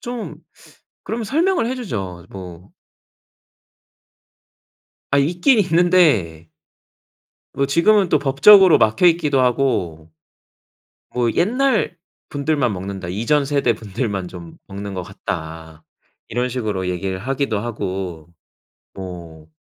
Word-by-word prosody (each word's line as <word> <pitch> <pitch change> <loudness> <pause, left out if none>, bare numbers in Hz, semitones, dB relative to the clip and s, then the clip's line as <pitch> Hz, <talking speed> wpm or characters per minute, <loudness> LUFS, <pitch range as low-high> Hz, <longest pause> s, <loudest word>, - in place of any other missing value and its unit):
좀 240 -2 -6 0.7
그러면 230 +1 -4
설명을 330 - +1
해 255 - -2
주죠. 95 - -6
뭐. 90 -1 -10 2.4
아, 140 - +3
있긴 175 - +2
있는데 160 - +2 1.1
뭐 140 0 0
지금은 185 +6 +3
또 - - +4
법적으로 165 +7 +6
막혀 110 +10 +3
있기도 150 -6 +2
하고. 105 - -1 1.0
뭐 120 -2 0
"옛날분들만 170 - -1
먹는다. 95 -1 -6
이전 115 +10 +1
세대분들만 110 -7 -2
좀 85 -2 -11
먹는 100 0 -7
것 90 - -4
같다." 80 -2 -7 0.4
이런 125 +2 -1
식으로 105 -7 -3
얘기를 95 +1 -3
하기도 135 0 -2
하고. 95 -7 -5 0.7
뭐. 85 -4 -9
120 Hz, 210 characters per minute, -20 LUFS, -, 2.4 s, 법적으로